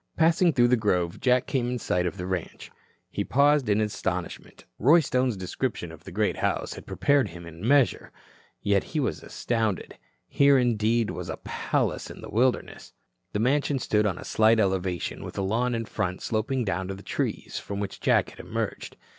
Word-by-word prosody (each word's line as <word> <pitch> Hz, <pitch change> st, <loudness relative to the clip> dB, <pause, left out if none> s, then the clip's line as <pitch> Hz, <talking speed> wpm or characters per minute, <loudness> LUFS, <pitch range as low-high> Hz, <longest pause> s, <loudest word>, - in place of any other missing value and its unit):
Passing 170 Hz, +2 st, +4 dB
through 120 Hz, -4 st, +3 dB
the 125 Hz, -, +5 dB
grove, 90 Hz, -6 st, 0 dB
Jack 125 Hz, 0 st, +3 dB
came 125 Hz, -3 st, -1 dB
in 125 Hz, -, -1 dB
sight 90 Hz, -6 st, 0 dB
of 95 Hz, -, -5 dB
the 90 Hz, -, -4 dB
ranch. 90 Hz, -2 st, -5 dB, 0.4 s
He -, -, -2 dB
paused 140 Hz, -2 st, +3 dB
in 105 Hz, +1 st, +3 dB
astonishment. 105 Hz, -1 st, -4 dB
Roy 150 Hz, +9 st, +6 dB
Stone's 130 Hz, -6 st, 0 dB
description 95 Hz, -1 st, -3 dB
of 80 Hz, -1 st, -14 dB
the 95 Hz, -, -8 dB
great 105 Hz, +3 st, 0 dB
house -, -, -1 dB
had -, -, -11 dB
prepared 140 Hz, -5 st, +2 dB
him 85 Hz, -1 st, -10 dB
in 85 Hz, -1 st, -11 dB
a 110 Hz, -, -2 dB
measure. 140 Hz, -1 st, +3 dB, 0.5 s
Yet 100 Hz, -1 st, +2 dB
he -, -, +3 dB
was 135 Hz, -, -1 dB
astounded. 110 Hz, -5 st, -2 dB, 0.3 s
Here, 140 Hz, -1 st, +5 dB
indeed, 115 Hz, -2 st, +2 dB
was -, -, -6 dB
a -, -, -4 dB
palace -, -, -2 dB
in -, -, -10 dB
the -, -, -9 dB
wilderness. 125 Hz, +3 st, 0 dB, 0.4 s
The 105 Hz, -, 0 dB
mansion 140 Hz, +3 st, +2 dB
stood 105 Hz, -4 st, +1 dB
on 95 Hz, -3 st, -2 dB
a -, -, -8 dB
slight 110 Hz, +1 st, +4 dB
elevation 95 Hz, -3 st, -1 dB
with -, -, -8 dB
a 100 Hz, -, 0 dB
lawn 120 Hz, +5 st, 0 dB
in 115 Hz, 0 st, -2 dB
front 95 Hz, -4 st, -3 dB
sloping 120 Hz, +3 st, -1 dB
down 95 Hz, -1 st, -2 dB
to 95 Hz, -, -4 dB
the 95 Hz, -, -12 dB
trees -, -, -3 dB
from 100 Hz, 0 st, -5 dB
which 100 Hz, -2 st, -5 dB
Jack -, -, +2 dB
had -, -, -16 dB
emerged. -, -, -4 dB
110 Hz, 195 wpm, -26 LUFS, 95-130 Hz, 0.5 s, Roy